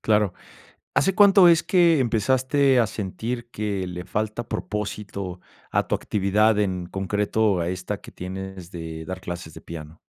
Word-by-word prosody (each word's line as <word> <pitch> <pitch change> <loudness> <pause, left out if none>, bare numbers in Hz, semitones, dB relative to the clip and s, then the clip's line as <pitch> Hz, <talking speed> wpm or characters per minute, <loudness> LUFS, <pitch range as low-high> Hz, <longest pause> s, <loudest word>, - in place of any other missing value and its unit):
Claro, 105 -4 +2 0.6
¿hace 195 -1 +3
cuánto 200 -3 +7
es 165 -1 +5
que 170 -4 +4
empezaste 130 +3 +2
a 115 - +3
sentir 115 +4 -4
que 105 -4 -2
le 90 0 -6
falta 110 +4 -3
propósito 100 -1 -4 0.3
a - - +1
tu - - 0
actividad 105 +2 +2
en 95 -4 0
concreto, 100 +1 0
a 85 - -1
esta 90 +3 -4
que - - -12
tienes 95 -1 -7
de 80 -2 -6
dar 95 +2 -6
clases 85 -3 -6
de - - -10
piano? 80 -1 -9
105 Hz, 155 wpm, -24 LUFS, 90-115 Hz, 0.6 s, cuánto